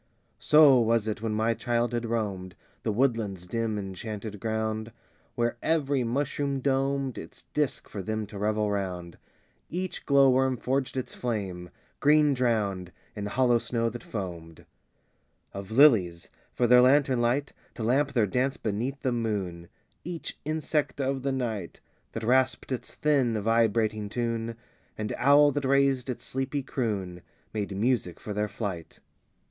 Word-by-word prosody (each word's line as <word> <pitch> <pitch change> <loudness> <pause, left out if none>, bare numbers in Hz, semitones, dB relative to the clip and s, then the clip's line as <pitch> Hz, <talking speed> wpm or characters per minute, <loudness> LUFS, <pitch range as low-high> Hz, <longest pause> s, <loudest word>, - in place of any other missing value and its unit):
VIII - - -42
So 150 -4 +7
was 115 -1 +2
it 110 -1 -3
when 110 -1 -1
my 110 +2 +2
childhood 120 0 -1
roamed 100 -5 -3 0.3
The 110 - -1
woodland's 110 -6 0
dim 115 +2 -2
enchanted 105 +2 -6
ground, 110 +1 -2 0.4
Where 120 0 0
every 145 -5 +1
mushroom 140 +3 -1
domed 135 0 0
Its 130 - -11
disc 145 -4 -1
for 100 - -6
them 110 +3 -3
to 100 0 -9
revel 105 0 0
round; 90 -4 -4 0.5
Each 185 +2 -4
glow 140 -1 +5
worm 130 0 +2
forged 130 +1 -1
its 130 - -4
flame, 95 -7 -4 0.3
green 150 0 +5
drowned 105 -8 0 0.2
In 105 -1 -4
hollow 120 +2 +3
snow 115 0 -1
that 120 - -7
foamed 85 -6 -6
IX - - -24 0.9
Of 100 -1 -7
lilies, 110 - +4 0.2
for 125 - +1
their 125 +1 +7
lantern 130 -1 +4
light, 125 +4 0 0.2
To 115 - -5
lamp 140 +5 +2
their 115 -5 +3
dance 130 +7 0
beneath 115 +6 -3
the 130 - +1
moon; 100 -8 -2 0.4
Each 170 0 -5
insect 155 -1 -1
of 135 0 -1
the 135 +1 -1
night, 115 -9 -3 0.3
That 115 - -5
rasped 130 +3 +2
its 130 - -5
thin, 135 -7 +2
vibrating 110 -1 +1
tune, 115 0 -2 0.4
And 110 -1 -3
owl 145 +3 +6
that 145 0 -2
raised 135 -1 +2
its 125 - -4
sleepy 135 +2 -3
croon, 100 -9 -3 0.3
Made 100 -2 -3
music 110 -5 0
for 105 - -6
their 105 +1 0
flight. 100 -5 -6
115 Hz, 150 wpm, -27 LUFS, 105-135 Hz, 0.9 s, So